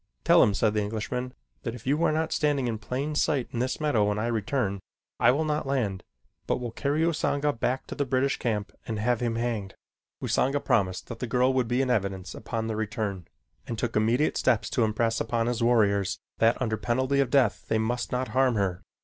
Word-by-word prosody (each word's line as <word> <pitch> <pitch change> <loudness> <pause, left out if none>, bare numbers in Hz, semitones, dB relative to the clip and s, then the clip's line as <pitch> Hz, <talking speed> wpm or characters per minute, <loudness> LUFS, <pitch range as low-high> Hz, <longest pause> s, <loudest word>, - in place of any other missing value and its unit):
"Tell - - +6
him," 100 - +4
said 105 +1 +2
the 105 - +1
Englishman, 115 +4 -3 0.3
"that 115 - -4
if 120 - -12
you 145 +5 +1
are - - +3
not 160 +1 -1
standing 145 -4 +1
in 110 -2 -2
plain 135 +6 -3
sight 145 -4 +1
in 120 - -3
this 130 +1 -1
meadow 145 -9 +2
when 105 0 0
I 110 - -1
return, 110 -2 -1 0.4
I - - +5
will 145 +5 +2
not 150 -1 -1
land, 110 -9 -1 0.5
but - - 0
will 120 -2 -4
carry 145 +5 -1
Usanga 150 -3 +1
back 125 +3 -1
to - - -7
the 145 - -1
British 135 +1 +1
camp 105 -4 -2 0.2
and 110 - -2
have 120 +2 +1
him 120 -2 -1
hanged." 115 -5 -2 0.4
Usanga 140 +2 +1
promised 95 -8 0
that 115 -2 -6
the 125 - -3
girl 125 +2 +2
would 130 -3 +1
be 125 +3 +1
in 130 - 0
evidence 95 -5 -1
upon 110 -1 -4
their 110 -1 -3
return, 105 -4 -3 0.4
and 115 - -4
took - - -2
immediate 115 +7 +2
steps 120 -5 +1
to 120 - +2
impress 115 +1 +1
upon 115 0 0
his 120 0 -1
warriors 100 -5 +3 0.2
that 115 +1 +3
under 110 -4 -1
penalty 130 +5 0
of 135 -3 +2
death 125 -5 +2
they 110 - +1
must 120 +2 -1
not 125 +1 -1
harm 130 -2 +2
her. 95 -4 -1
120 Hz, 215 wpm, -27 LUFS, 110-130 Hz, 0.5 s, Tell